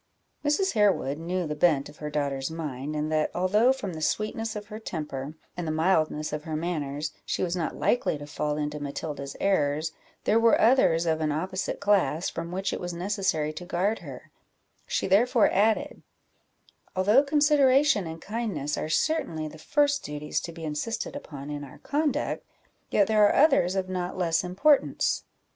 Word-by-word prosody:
Mrs. 300 +7 +2
Harewood 195 - +2
knew 175 +2 -2
the 150 - -2
bent 150 -2 +2
of 150 - -14
her 150 - -5
daughter's 140 -2 -2
mind, 150 -3 -5
and 150 +1 -2
that 155 -1 +1
although, 210 +7 +4
from 205 -9 -3
the 160 - -6
sweetness 215 +5 -1
of 210 0 -5
her 210 +1 -8
temper 150 -7 -5 0.2
and 175 -2 -4
the - - 0
mildness 155 -2 +1
of 150 0 -3
her 155 -1 -4
manners, 155 -2 -3
she - - -2
was 175 -1 -1
not 170 -3 -2
likely 245 -10 +1
to 145 - -8
fall 150 0 -2
into 150 0 -3
Matilda's 140 -1 -5
errors, 155 -4 +1 0.3
there 220 - +3
were 230 0 +4
others 220 -9 +4
of 160 -1 +1
an 155 -1 +1
opposite 185 +5 -2
class, 200 -4 +2
from 165 +1 -5
which 190 +2 -2
it - - -3
was 175 -1 -4
necessary 175 -4 -1
to 180 - -7
guard 185 +5 0
her; - - -10 0.6
she - - -1
therefore 230 +4 +4
added 220 +9 +1 0.9
"Although 205 +8 +5
consideration 285 - +4
and 160 0 -7
kindness 195 -9 -3
are 155 - -3
certainly 160 - 0
the 155 +1 -11
first 285 - +1
duties 150 0 -3
to 170 - -6
be 165 0 -10
insisted 160 - -3
upon 145 - -7
in 145 0 -5
our 135 - -11
conduct, 295 0 -1 0.5
yet 205 - +4
there 215 0 +3
are - - +1
others 195 - +4
of 190 -1 -1
not 180 -1 -3
less 165 -2 +1
importance. 200 +12 +2
175 Hz, 175 wpm, -27 LUFS, 150-215 Hz, 0.9 s, Although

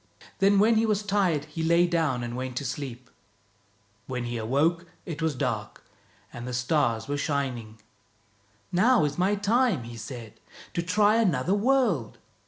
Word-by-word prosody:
Then 195 +1 +4
when 220 +3 +4
he 225 - +3
was 210 -1 0
tired 190 -7 +1
he 150 +2 -6
lay 170 +2 +4
down 160 -8 0
and 120 0 -5
went 130 -1 -4
to 140 - -3
sleep. 130 -2 -5 1.0
When 125 -2 -3
he 120 0 -4
awoke 150 +10 0 0.2
it 165 -2 -6
was 160 -3 0
dark, - - -3 0.5
and 120 +1 -7
the 125 - -5
stars 125 -4 0
were 145 0 -2
shining. 130 -7 -3 0.5
" 100 0 -37
Now 240 -6 +5
is 145 +3 -3
my 195 +3 +2
time," 205 - +1
he 115 0 -9
said, 115 -1 -9 0.2
" - - -18
to 170 - 0
try 205 +5 +3
another 180 - +2
world." 205 - +1
150 Hz, 170 wpm, -27 LUFS, 125-195 Hz, 1.0 s, Now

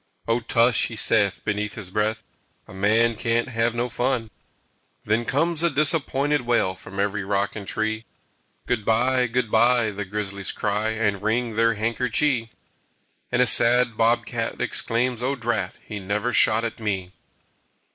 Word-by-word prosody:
"O 115 +1 +2
tush!" 115 0 +3
he 115 - -8
saith 105 -2 +2
beneath 105 0 -2
his 95 -4 -8
breath, 105 +2 -1 0.4
"A - - -13
man 110 +4 +2
can't 115 +2 -1
have 115 -1 0
no 120 +1 -1
fun!" 120 -2 -2 0.7
Then 110 +3 0
comes 165 +5 +1
a 170 - +3
disappointed 145 -1 +1
wail 120 -6 +1
From 95 +1 -10
every 100 0 -1
rock 100 +1 -1
and 100 -3 -7
tree. 110 +1 -2 0.6
"Good 120 -3 -1
by, 125 +4 +2
good 115 -1 -2
by!" 120 0 +3
the 105 +1 -5
grizzlies 100 0 -3
cry 105 +1 -1
And 110 -3 -1
wring 115 +1 -1
their 115 0 +2
handkerchee. 115 +2 0 0.8
And 125 - +3
a - - +2
sad 120 0 +4
bob 115 +2 +2
cat - - -4
exclaims, 120 +1 -1
"O 135 +3 0
drat! 115 -7 -2
He 105 -2 -6
never 100 +5 -2
shot 110 +1 +4
at 115 0 -4
me!" 95 -4 -3
115 Hz, 155 wpm, -23 LUFS, 105-120 Hz, 0.8 s, sad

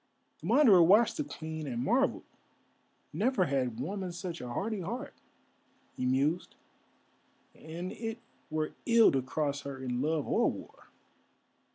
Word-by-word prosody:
The - - -7
Wanderer 220 -12 +6
watched 205 - +5
the 305 - 0
Queen 160 - -6
and 120 -2 -2
marvelled. 260 - +1 0.9
"Never 235 -4 +2
had 130 -6 -1
woman 190 -2 -3
such 175 0 -6
a 125 - -6
hardy 200 - -2
heart," 240 - -5 0.8
he 125 - -1
mused; 140 +7 0 1.0
"and 170 +4 -7
it 225 0 -5 0.3
were 155 0 -1 0.2
ill 230 -1 +6
to 135 - +1
cross 145 +2 -2
her 140 -1 -6
in 125 -1 -3
love 155 0 0
or - - +3
war!" - - -12
165 Hz, 140 wpm, -31 LUFS, 140-215 Hz, 1.0 s, Wanderer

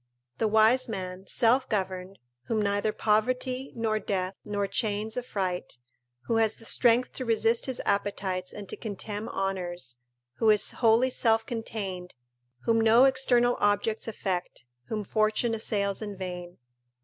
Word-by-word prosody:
["The 220 - +2
wise 220 +4 +4
man, 185 -2 -5
self 245 +3 +3
governed, 190 -2 -2 0.3
whom 225 -2 0
neither 205 +1 +1
poverty, 250 +5 0
nor 220 -2 0
death, 190 -3 -2
nor 205 -1 -1
chains 210 +2 -2
affright: 185 - -3 0.4
who 230 - -1
has 220 -1 +2
the 225 - -15
strength 245 +2 +3
to 260 - -4
resist 230 0 +1
his 260 - -3
appetites 195 -2 -1
and 205 -1 -8
to - - -4
contemn 210 +1 -5
honours: 180 -9 -3 0.4
who 225 - +3
is 210 -1 +4
wholly 235 +2 +3
self 225 -2 +2
contained: 200 -6 -5 0.5
whom 225 -1 +3
no 225 +3 +6
external 250 -2 +3
objects 205 +2 +1
affect: 185 - -3 0.2
whom 215 -1 -3
fortune 215 +3 +1
assails 200 -3 -1
in 205 -2 -5
vain." 180 -1 -6
215 Hz, 140 wpm, -28 LUFS, 195-230 Hz, 0.5 s, no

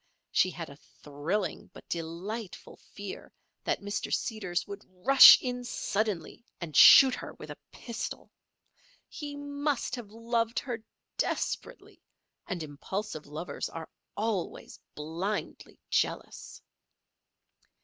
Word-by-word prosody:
She 185 - +3
had 170 -3 -6
a 140 - -11 0.3
thrilling 160 +6 -3
but - - -14
delightful 175 +6 -5
fear - - -9 0.3
that - - 0
Mr. 205 0 -3
Seeders 200 -6 -1
would 200 0 -8 0.2
rush 270 0 +11
in 250 -1 -4
suddenly 215 -4 -2 0.2
and 170 -4 -7
shoot 265 -2 +10
her - - -6
with - - -9
a - - -8
pistol. 235 -2 -6 0.8
He 290 -1 -7
must 285 -2 -2
have 240 -5 -8
loved 230 +1 -1
her 240 -5 -3 0.4
desperately; - - -3 0.5
and 175 -3 -3
impulsive 155 +3 -5
lovers 155 +4 -5
are 165 -1 -7 0.3
always 210 -4 -3 0.2
blindly 170 +7 -4
jealous. - - -2
210 Hz, 110 wpm, -29 LUFS, 170-240 Hz, 0.8 s, rush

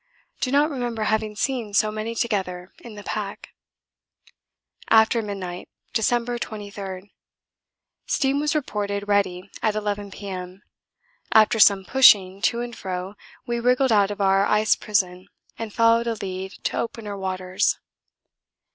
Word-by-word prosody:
Do 255 - -1
not 290 +3 +3
remember 240 -5 -3
having 215 0 0
seen 230 -4 -2
so 215 +1 +3
many 215 +2 -4
together 190 -6 -2
in 230 -3 -11
the 205 - -9
pack. 200 -1 -5 1.4
After 225 +1 +5
midnight, 190 -4 -6 0.2
December 240 +1 0
23. 200 -3 -7 0.9
Steam 275 +1 +1
was 300 +1 0
reported 205 -7 -2
ready 195 -2 0
at 215 -1 +1
11 205 -1 -3
P.M. 190 -1 -8 0.7
After 220 +1 +5
some 195 -2 +6
pushing 200 -7 +5
to 235 +2 +1
and 240 -1 -6
fro 185 -1 -5 0.3
we 235 0 -2
wriggled 250 +2 +2
out 205 -2 +4
of 205 - -6
our 195 0 +4
ice 215 +1 +3
prison 185 -3 -1 0.3
and 225 -2 -5
followed 230 +1 +3
a 230 - 0
lead 190 -1 -5
to - - -1
opener 225 -3 -4
waters. 185 0 -1
210 Hz, 135 wpm, -24 LUFS, 195-230 Hz, 1.4 s, some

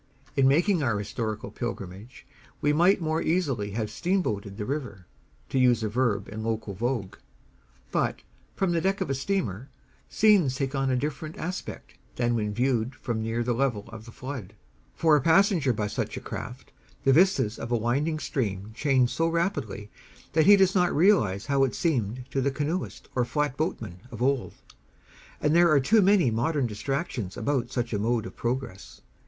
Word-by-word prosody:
In 135 -2 +4
making 170 +6 +3
our 115 -7 +1
historical 110 0 -4
pilgrimage 105 0 -7 0.3
we 145 0 +2
might 175 +5 +4
more 160 0 0
easily 140 - 0
have 110 -1 -2
"steamboated" 110 - -1
the 105 - -3
river, 125 - -4 0.4
to 135 - 0
use 125 -3 +4
a 110 - 0
verb 105 -3 0
in 110 +1 -6
local 110 -2 -3
vogue; 105 -2 -3 0.7
but, - - -1 0.3
from 190 -2 +1
the 170 -1 +1
deck 195 +2 0
of - - -1
a - - +2
steamer, 135 - -2 0.4
scenes 195 -12 +4
take 135 0 -2
on 135 -1 0
a 130 - +2
different 150 +4 -4
aspect 180 +3 -6 0.2
than 120 -1 +1
when 105 -3 -1
viewed 120 +1 0
from 115 -4 -3
near 115 +2 -1
the 120 +1 0
level 120 -4 -1
of 110 -1 -10
the 115 - -11
flood; 125 -6 -7 0.4
for 160 -2 +4
a 145 - +3
passenger 165 - +4
by 105 -2 -1
such 105 - -3
a - - -3
craft, 130 +2 -8 0.3
the 135 -1 +4
vistas 165 - +3
of 120 - -6
a 120 - +3
winding 140 +8 0
stream 105 -9 -3
change 130 -1 +2
so 165 - +1
rapidly 150 - -2 0.4
that 160 0 +3
he 205 - +10
does 190 -1 +4
not 180 -2 +3
realize 145 - +3
how 140 -1 +2
it 135 - 0
seemed 125 - -1
to 135 - 0
the 140 - +2
canoeist 150 +6 -3
or 125 - +1
flatboatman 125 - -2
of 115 - -9
old; 130 0 0 0.8
and 150 +2 +2
there 170 0 +6
are 150 -3 +5
too 215 +11 +4
many 195 - +4
modern 135 +5 0
distractions 120 - -3
about 130 -4 -1
such 120 -2 -3
a 105 - 0
mode 115 +1 0
of - - -9
progress. 120 -5 -4
130 Hz, 180 wpm, -27 LUFS, 110-155 Hz, 0.8 s, he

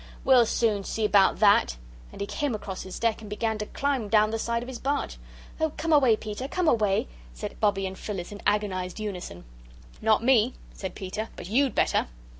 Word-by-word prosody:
"We'll 255 -3 +5
soon 215 -4 +1
see 220 +2 -2
about 200 -2 +4
that." 200 - +4 0.3
And - - -12
he - - 0
came 275 +3 -2
across 195 -3 -6
his 185 - -7
deck 230 -1 0
and 215 - -9
began 220 +1 -2
to 210 - -4
climb 270 -7 -1
down 215 0 +4
the 225 - -2
side 235 +1 -1
of - - -9
his 260 -2 -7
barge. 280 +2 -2 0.4
"Oh, 315 -1 0
come 325 0 0
away, 260 -7 +6
Peter, 215 +4 -5
come 360 +3 -1
away!" 210 -8 +2 0.3
said - - -7
Bobbie 200 -2 +1
and 190 0 -4
Phyllis, 190 -3 -6
in 205 - -9
agonised 190 -3 -1
unison. 180 - -6 0.6
"Not 220 0 +3
me," 245 -1 +4 0.2
said 190 -2 -6
Peter, 200 +4 -5
"but 175 - -8
YOU'D 265 +4 +2
better." - - +2
215 Hz, 200 wpm, -27 LUFS, 200-245 Hz, 0.6 s, away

